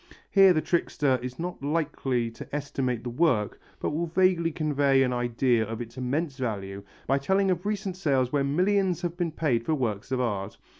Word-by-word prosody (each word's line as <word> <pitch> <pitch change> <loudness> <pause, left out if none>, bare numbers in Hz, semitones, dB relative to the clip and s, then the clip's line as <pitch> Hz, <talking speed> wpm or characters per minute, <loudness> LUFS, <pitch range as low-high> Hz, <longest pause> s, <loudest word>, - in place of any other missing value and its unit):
Here 195 -1 +7
the 155 -3 +1
trickster 145 -5 +1
is 125 0 -6
not 175 -2 -5
likely 140 -5 -1
to 115 - -8
estimate 130 -4 -2
the 120 - -4
work 120 -7 +1 0.2
but - - -1
will 165 +3 -1
vaguely 170 -1 +2
convey 145 -3 +2
an 125 -1 0
idea 120 -1 +1
of 110 +1 -5
its 120 -1 -7
immense 135 +3 -2
value 100 -5 -4 0.2
by 135 +1 +2
telling 190 +6 +2
of 180 +2 -2
recent 205 -3 -2
sales 135 -9 +1
where 145 -2 +1
millions 185 +4 +1
have 175 -1 -2
been 175 -2 -1
paid 140 -7 0
for 155 - 0
works 115 -3 -3
of 130 - 0
art. 105 -5 -2
140 Hz, 190 wpm, -27 LUFS, 125-170 Hz, 0.2 s, Here